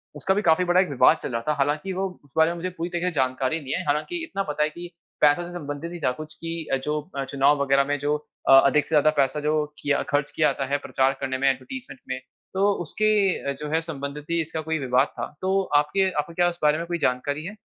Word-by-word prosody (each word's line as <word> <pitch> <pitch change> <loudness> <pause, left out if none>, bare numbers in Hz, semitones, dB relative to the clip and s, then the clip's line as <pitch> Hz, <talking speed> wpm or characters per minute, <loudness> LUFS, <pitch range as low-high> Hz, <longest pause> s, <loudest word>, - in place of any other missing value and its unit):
उसका 190 - +1
भी 205 - +1
काफी 165 0 +4
बड़ा 175 +1 +4
विवाद 140 +3 +5
चल - - -3
रहा 115 0 -2
था। 150 - +3
हालाँकि 150 +7 0
वो 190 +1 -1 0.2
उस 140 - -24
बारे 160 +1 +5
में - - -4
मुझे 185 +2 -3
पूरी 170 +2 -3
तरह 175 0 -3
से 180 0 0
जानकारी 130 +3 0
नहीं 135 -3 -5
है - - -1
हालाँकि 150 - -1
इतना 260 -12 -3
पता 150 -1 -1
है 150 - +1
कि, 175 +3 -8 0.3
पैसों 150 +4 +5
से 175 - -9
संबंधित 150 0 -5
नहीं 175 - -7
था 130 - +3
कुछ 155 +3 -8
की 165 -1 -5
अ, - - +5
जो 150 +3 -2 0.2
अ, 135 - 0
चुनाव 140 +1 +2
वगैरह 140 0 +3
में 145 +1 0
जो 145 +1 0 0.3
अ, - - +9
अधिक 145 +2 +3
से - - -17
ज्यादा 150 +1 +5
पैसा 135 +2 +2
जो 150 +1 0 0.3
किया 140 -1 +1
खर्च 145 0 0
किया 155 - +2
जाता 135 - -3
है, 145 - +3
प्रचार 135 -1 +1
करने 130 -1 -1
में 135 +1 +3
एडवर्टाइज़मेंट 255 - -5
में 130 - -2 0.3
तो 200 +2 +3
उसके 200 -5 +1
जो 150 - -5
है 160 - +3
संबंधित 145 -2 -6
ही 170 0 +1
इसका 160 0 -4
कोई 160 +1 -2
विवाद 130 +1 +2
था, - - -1 0.2
तो 190 +1 +2
आपके 170 +7 +3
आपको 150 +1 -3
क्या 175 +1 +3
इस 170 - -8
बारे 150 +1 +4
में 170 - -3
कोई 175 - -1
जानकारी 145 +4 -1
है? 210 +4 -6
150 Hz, 255 wpm, -24 LUFS, 140-175 Hz, 0.3 s, अ